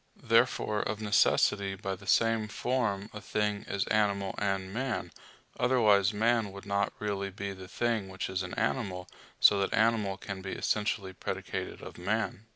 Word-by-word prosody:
Therefore 115 -2 +2
of 105 0 -2
necessity 100 -2 +3
by 95 0 -4
the 95 +1 -10
same 115 +1 +3
form 110 -3 -1
a 105 - -7
thing 105 -1 -1
is 100 - -1
animal 100 -3 +1
and 95 -2 -1
man; 125 0 -2 0.5
otherwise 110 -5 +4
man 110 0 +1
would 100 +1 -10
not 100 0 0
really 100 -2 -2
be 100 +1 -5
the 95 -1 -10
thing 115 -2 -1
which 95 0 -4
is 95 0 -2
an 90 - -5
animal, 95 -8 -1 0.3
so 100 - +6
that 100 - 0
animal 110 -4 +2
can 100 -1 -6
be 95 0 -5
essentially 105 -2 -1
predicated - - -5
of - - -9
man. 110 +3 -2
100 Hz, 160 wpm, -30 LUFS, 95-110 Hz, 0.5 s, so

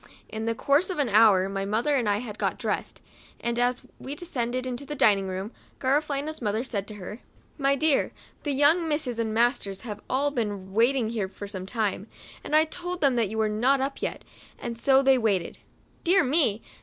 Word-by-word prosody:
In 220 0 -4
the 230 0 0
course 285 - +2
of 370 - -3
an 285 -4 +1
hour 205 -3 +5
my 195 0 -3
mother 225 +9 +1
and 240 -6 +1
I 205 - +2
had 215 -2 -8
got - - 0
dressed, - - -3 0.4
and 235 0 -2
as 245 0 +1 0.2
we 275 +2 -5
descended 255 -7 -2 0.2
to - - -6
the 295 +1 -6
dining 200 -7 +4
room, 190 +3 -4 0.3
Gara 275 +3 +2
felina's 300 0 -4
mother 215 +1 0
said 205 -6 -3
to 215 - -8
her, 210 +3 -8 0.2
" - - -34
My 275 - +4
clear, 305 0 +2 0.3
the 290 - -2
young 295 +5 +4
misses 295 -6 -1
and 225 -1 -1
masters 220 -4 +1
have 210 -3 -7
all 280 +2 +1
been 205 -7 -3
waiting 235 +1 +2
here 210 -5 -2 0.2
some 190 -2 -6
time, 215 -2 -2 0.4
and 300 - -1
I 310 +1 +6
told 355 +2 -4
them 275 -4 +3
that 230 -4 +1
you 220 - -5
were 220 -1 +2
not 245 +6 +2
up 275 +1 -3
yet, - - -3 0.3
and 235 -1 -5
so 265 +3 +4
they 265 -1 +5
waited." 200 -7 0 0.2
" - - -35
Dear 370 +2 +4
me 255 -6 +2
240 Hz, 210 wpm, -26 LUFS, 210-280 Hz, 0.4 s, I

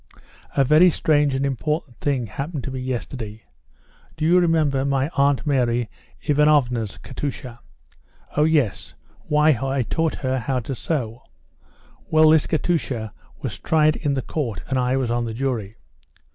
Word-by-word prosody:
"A 135 - +5
very 155 +7 +6
strange 145 -4 +2
and 135 +1 0
important 140 0 -2
thing 135 -4 -1
happened 140 - -5
to 135 - -4
me 130 - -4
yesterday. 120 -3 -5 0.7
Do 155 - -1
you 175 +3 +5
remember 155 -6 +2
my 140 0 0
Aunt 140 -2 +1
Mary 120 -5 +1 0.3
Ivanovna's 140 -7 +2
Katusha?" 130 -2 -6 0.8
"Oh, 150 - +3
yes. 150 -10 0 0.3
Why, 150 0 +4
I 135 -1 0
taught 160 +6 -1
her 130 -1 -1
how 130 +2 -1
to 135 - -5
sew." 125 -4 -3 0.9
"Well, 155 0 +6
this 160 -2 +4
Katusha 135 - -1 0.3
was - - -4
tried 155 -1 +3
in 145 -3 -1
the 135 - -2
Court 115 - -3
and 135 -1 0
I 125 +1 +1
was 125 -3 -1
on 120 0 0
the 110 -1 -5
jury." 115 -5 -2
135 Hz, 150 wpm, -22 LUFS, 125-150 Hz, 0.9 s, very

